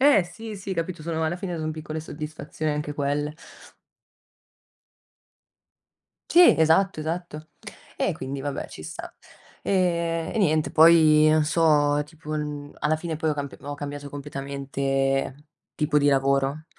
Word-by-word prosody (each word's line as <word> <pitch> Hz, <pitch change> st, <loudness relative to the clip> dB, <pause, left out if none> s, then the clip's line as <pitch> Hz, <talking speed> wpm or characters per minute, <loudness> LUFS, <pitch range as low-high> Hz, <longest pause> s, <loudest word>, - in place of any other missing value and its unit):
Eh, 270 Hz, -10 st, +6 dB
sì, 220 Hz, +3 st, -8 dB
sì, 195 Hz, 0 st, -5 dB
capito, 165 Hz, -1 st, -3 dB
sono 160 Hz, 0 st, -2 dB
alla 165 Hz, +3 st, -1 dB
fine 180 Hz, -2 st, -4 dB
sono 155 Hz, 0 st, -3 dB
piccole 155 Hz, 0 st, -5 dB
soddisfazioni 155 Hz, 0 st, -5 dB
anche 150 Hz, 0 st, -3 dB
quelle. 145 Hz, +1 st, -1 dB, 3.0 s
Sì, 350 Hz, 0 st, +8 dB
esatto, 160 Hz, +3 st, +3 dB
esatto. 160 Hz, -1 st, -5 dB, 0.5 s
E -, -, 0 dB
quindi 135 Hz, +1 st, -5 dB
vabbè, 140 Hz, 0 st, -4 dB
ci -, -, -10 dB
sta, 80 Hz, -, -8 dB, 0.5 s
ehm, 170 Hz, -3 st, 0 dB
e -, -, -1 dB
niente, 155 Hz, -6 st, +2 dB
poi 155 Hz, -1 st, +7 dB
non 155 Hz, 0 st, +3 dB
so, 150 Hz, -2 st, +3 dB
tipo, 155 Hz, 0 st, -12 dB
uhm, 150 Hz, -1 st, -4 dB
alla 155 Hz, +1 st, +2 dB
fine 160 Hz, 0 st, -4 dB
poi 160 Hz, 0 st, 0 dB
ho -, -, 0 dB
camp 140 Hz, -1 st, -5 dB
ho 145 Hz, 0 st, -6 dB
cambiato 145 Hz, 0 st, -6 dB
completamente 135 Hz, -1 st, -2 dB, 0.3 s
tipo 150 Hz, -1 st, 0 dB
di 145 Hz, -, +1 dB
lavoro 140 Hz, +2 st, +1 dB
155 Hz, 140 wpm, -25 LUFS, 145-165 Hz, 3.0 s, Sì